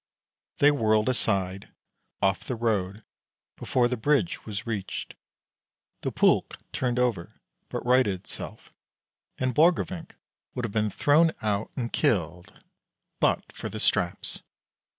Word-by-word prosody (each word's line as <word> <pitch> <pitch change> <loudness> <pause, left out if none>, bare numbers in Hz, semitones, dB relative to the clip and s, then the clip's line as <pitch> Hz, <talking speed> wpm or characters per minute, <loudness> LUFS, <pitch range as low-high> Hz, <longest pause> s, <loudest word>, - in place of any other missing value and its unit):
They 145 +1 +6
whirled 110 -4 +2
aside, 95 -6 -1 0.5
off 95 0 +2
the 125 - -2
road, 110 -3 -1 0.5
before 125 -2 +1
the 125 - -1
bridge 145 +7 0
was 105 +1 -4
reached. 105 -5 -4 0.9
The - - -2
pulk - - +2
turned 125 -1 -1
over, 120 -9 -1 0.3
but - - -4
righted 125 -5 +4
itself, - - -8 0.6
and 130 -1 0
Borgrevinck 165 +2 +2 0.4
would 125 -2 -2
have 105 - -5
been 105 -1 +1
thrown 155 - +4
out 105 -1 0
and 120 -3 -3
killed 90 -3 -1 0.6
but - - +1
for - - -6
the - - -6
straps. 85 0 -1
115 Hz, 125 wpm, -27 LUFS, 100-130 Hz, 0.9 s, They